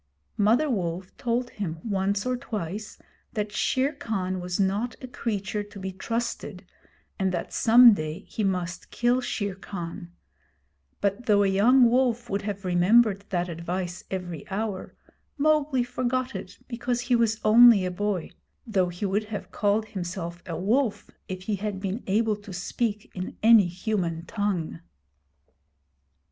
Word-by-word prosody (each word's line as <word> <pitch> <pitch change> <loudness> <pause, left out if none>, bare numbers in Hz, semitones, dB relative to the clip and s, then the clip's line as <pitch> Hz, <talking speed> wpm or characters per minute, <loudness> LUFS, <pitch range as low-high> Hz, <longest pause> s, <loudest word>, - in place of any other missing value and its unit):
Mother 225 +9 +4
Wolf 185 - -3
told 240 +1 -1
him 170 -6 -4
once 200 0 0
or 255 0 +1
twice 215 -5 -5 0.4
that 210 -1 -2
Shere 265 +7 +1
Khan 190 -8 -3
was 180 +1 -3
not 200 +5 0
a 255 - -8
creature 210 -4 -3
to 205 -1 -10
be 190 0 -4
trusted, 230 +5 -4 0.5
and 190 -1 +1
that 175 -2 -4
some 235 0 +8
day 155 -1 -4
he 215 - -4
must 180 -2 -2
kill 245 +2 +1
Shere 205 -5 -2
Khan; 175 -2 -7 0.9
but 200 +4 -1
though 205 -2 +5
a - - +3
young 235 +6 +5
wolf 240 -1 +1
would 200 +1 0
have 200 -1 -5
remembered 200 +3 +4
that 175 -1 0
advice 175 +1 -4
every 175 -5 -4
hour, 200 -1 -3 0.4
Mowgli 295 -3 +2
forgot 255 +1 -1
it - - -7
because 240 0 -2
he 245 0 +2
was 225 -2 +2
only 225 -3 +8
a 180 - -1
boy 195 -2 -2 0.3
though 190 -6 +1
he 175 +4 -4
would 200 +2 0
have 205 -3 -6
called 210 +1 +1
himself 175 -3 -5
a 165 - -3
wolf 220 +5 0 0.2
if 185 0 -6
he 205 +1 -1
had 205 -1 -3
been 195 +4 -3
able 215 +2 +2
to 205 -1 -12
speak 205 +4 -3
in 185 0 -6
any 225 -4 +7
human 175 -3 -2
tongue. 185 - -2
205 Hz, 150 wpm, -26 LUFS, 185-235 Hz, 0.9 s, some